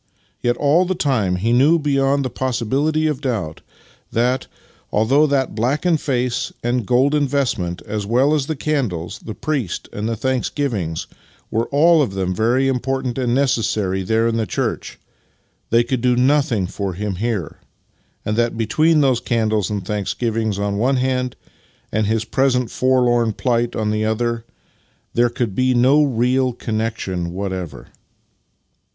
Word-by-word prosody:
Yet 120 0 +1
all 150 +5 +3
the 185 +1 -1
time 125 - +1
he 110 +6 0
knew 145 +7 +5
beyond 140 -2 +1
the 130 - -3
possibility 130 +6 0
of 150 -3 -1
doubt 110 - -3 0.5
that, 125 +3 0 0.4
although 135 +8 +3
that 140 -2 0
blackened 145 - +1
face 125 -3 -1
and 120 -3 -1
golden 140 +4 +3
vestment, 115 -11 -1
as 105 -1 -3
well 125 +8 +2
as 145 -3 0
the 160 - -2
candles, 120 - -2
the 110 - -8
priest, 140 - -3
and 105 +2 -3
the 115 - -1
thanksgivings, 120 - -2 0.5
were 115 +1 0
all 160 +3 +5
of 100 -9 -1
them 95 -1 -1
very 120 +7 +2
important 130 0 -1
and 120 -2 +1
necessary 110 -8 +1
there 110 +4 +1
in 115 0 0
the 110 -2 -1
church, - - -3 0.7
they 115 +1 +4
could 120 0 -2
do 125 0 +3
nothing 125 -5 +2
for 95 +1 -4
him 100 0 -4
here, 105 -6 -3 0.7
and 105 - -1
that 120 -1 +1
between 155 +8 +3
those 130 -4 +3
candles 110 -4 0
and 100 -3 -3
thanksgivings 110 +1 -2
on 100 0 -1
tlie - - -2
one 130 +4 +2
hand, 125 -1 -1 0.6
and 110 -1 0
his 110 0 0
present 125 +1 +1
forlorn 120 -3 +2
plight 120 0 0
on 105 -1 -1
the 110 0 0
other, 115 +1 -1 0.7
tliei'e 120 0 +2
could 120 -6 -1
be 130 +4 +2
no 130 +5 +5
real 130 -1 +1
connection 110 -7 -3
whatever. 95 -5 -5
120 Hz, 155 wpm, -20 LUFS, 110-135 Hz, 0.7 s, knew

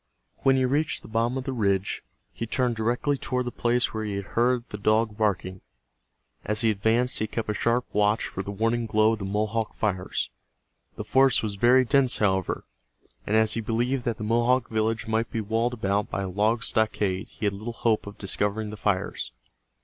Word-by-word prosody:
When 135 -1 +3
he 130 -1 +2
reached 145 +4 0
the - - -11
bottom 115 +3 0
of 130 - -3
the 135 - -3
ridge 100 -4 0 0.3
he 115 - -5
turned 125 +1 0
directly 120 +5 0
toward 125 -1 -2
the 120 - -3
place 120 0 0
where 110 0 -3
he 105 -2 -3
had 100 -1 -4
heard 120 +1 +2
the 105 - -6
dog 110 +1 +2
barking. 95 -3 -1 0.8
As 105 0 0
he 115 - +4
advanced 110 +5 +1
he 110 - -1
kept 110 -1 -3
a - - -1
sharp 115 +4 +1
watch 105 +1 +2
for 95 - -4
the 100 - -7
warning 115 +3 0
glow 110 +1 +3
of 110 - -4
the 100 - -4
Mohawk 110 +3 -1
fires. 95 -4 -2 0.6
The - - -5
forest 135 -2 +3
was 105 -2 -2
very 125 +6 +4
dense, 130 0 +3
however, 95 -3 0 0.6
and 105 - +1
as 110 -1 +4
he 115 - -1
believed 120 +4 -1
that 115 -2 -1
the - - -6
Mohawk 120 +3 +2
village 110 0 0
might 110 +1 0
be 115 - -3
walled 115 +3 0
about 100 -2 -1
by 100 - -2
a 95 - -3
log 110 +5 +1
stockade 105 -4 +1
he - - -6
had 100 - +1
little 110 +4 -5
hope 115 -2 0
of 100 - -9
discovering 105 +2 -1
the 105 - -8
fires. 100 -10 -1
110 Hz, 205 wpm, -26 LUFS, 105-120 Hz, 0.8 s, he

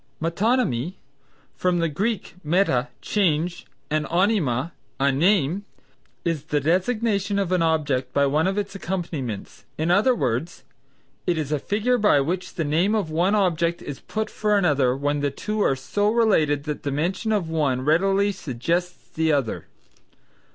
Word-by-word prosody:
Metonymy 170 - 0 0.6
(from 180 -1 +1
the 165 -1 +1
Greek 200 +7 -2
meta, 150 -7 +2 0.2
change, 175 -4 0 0.2
and 155 0 0
onyma, 170 - +1 0.3
a 140 +1 +3
name) 175 +4 +2 0.6
is 160 -4 -1
the 150 -1 0
designation 200 - 0
of 195 -3 0
an 180 -2 +2
object 145 -6 0
by 140 +1 +3
one 150 +5 +2
of 195 +1 -1
its 205 -1 -2
accompaniments, 170 - -5
in 160 +2 0
other 215 +8 +4
words, 125 - -2 0.6
it 175 -2 +2
is 150 -2 -3
a 150 - +1
figure 220 - 0
by 205 -9 +4
which 180 +6 -2
the 165 - -1
name 170 +9 +2
of 195 -7 -1
one 175 +6 +2
object 170 -4 +1
is 145 - -6
put 220 0 -4
for 210 -1 +1
another 140 -9 +2
when 145 +1 0
the 145 0 0
two 210 +9 -3
are 135 - +3
so 205 +10 0
related 165 -11 +2
that 150 -1 -4
the 145 - -3
mention 180 - -1
of 200 -6 0
one 140 -6 +1
readily 195 +6 +3
suggests 175 +2 -3
the 160 0 0
other. 140 -7 -1
170 Hz, 160 wpm, -24 LUFS, 145-200 Hz, 0.6 s, other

